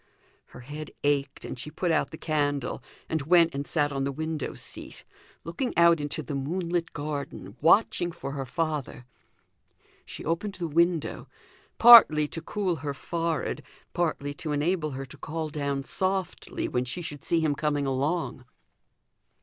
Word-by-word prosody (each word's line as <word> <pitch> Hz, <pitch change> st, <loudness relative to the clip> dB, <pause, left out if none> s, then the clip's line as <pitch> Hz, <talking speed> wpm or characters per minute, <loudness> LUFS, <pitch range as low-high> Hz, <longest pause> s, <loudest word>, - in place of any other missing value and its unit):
Her -, -, -13 dB
head 150 Hz, +4 st, -7 dB
ached, 140 Hz, -1 st, 0 dB
and 125 Hz, -, -6 dB
she 145 Hz, -, -5 dB
put 175 Hz, +3 st, -1 dB
out 150 Hz, -3 st, +1 dB
the 160 Hz, -, -9 dB
candle, 145 Hz, -5 st, -1 dB, 0.3 s
and 160 Hz, -, -1 dB
went 165 Hz, +2 st, +4 dB
and 140 Hz, +1 st, -4 dB
sat 145 Hz, -2 st, +1 dB
on 135 Hz, -1 st, -2 dB
the 140 Hz, -, -1 dB
window 160 Hz, 0 st, -4 dB
seat, -, -, -9 dB, 0.4 s
looking 175 Hz, -, -3 dB
out 170 Hz, -1 st, +6 dB
into 145 Hz, +1 st, -3 dB
the 145 Hz, -, -6 dB
moonlit 170 Hz, +4 st, -2 dB
garden, 145 Hz, -10 st, -5 dB
watching 175 Hz, +1 st, +4 dB
for 140 Hz, -4 st, -6 dB
her 135 Hz, -2 st, -4 dB
father. 150 Hz, -4 st, -3 dB, 1.0 s
She -, -, -8 dB
opened 180 Hz, +5 st, -2 dB
the 175 Hz, -2 st, -3 dB
window; 170 Hz, +1 st, +1 dB, 0.5 s
partly 220 Hz, -11 st, +9 dB
to 165 Hz, -, -5 dB
cool 190 Hz, -4 st, -1 dB
her 140 Hz, 0 st, -4 dB
forehead, 165 Hz, +1 st, -2 dB, 0.3 s
partly 155 Hz, -4 st, -1 dB
to 150 Hz, +1 st, -5 dB
enable 155 Hz, +2 st, 0 dB
her 135 Hz, -, -5 dB
to 130 Hz, -, -12 dB
call 160 Hz, 0 st, -4 dB
down 140 Hz, -2 st, -2 dB
softly 190 Hz, +5 st, -2 dB
when 125 Hz, 0 st, 0 dB
she 175 Hz, +8 st, -4 dB
should 145 Hz, -3 st, -6 dB
see 170 Hz, -, +2 dB
him 155 Hz, -2 st, +2 dB
coming 145 Hz, -1 st, 0 dB
along. 135 Hz, +1 st, -1 dB
155 Hz, 160 wpm, -27 LUFS, 140-170 Hz, 1.0 s, partly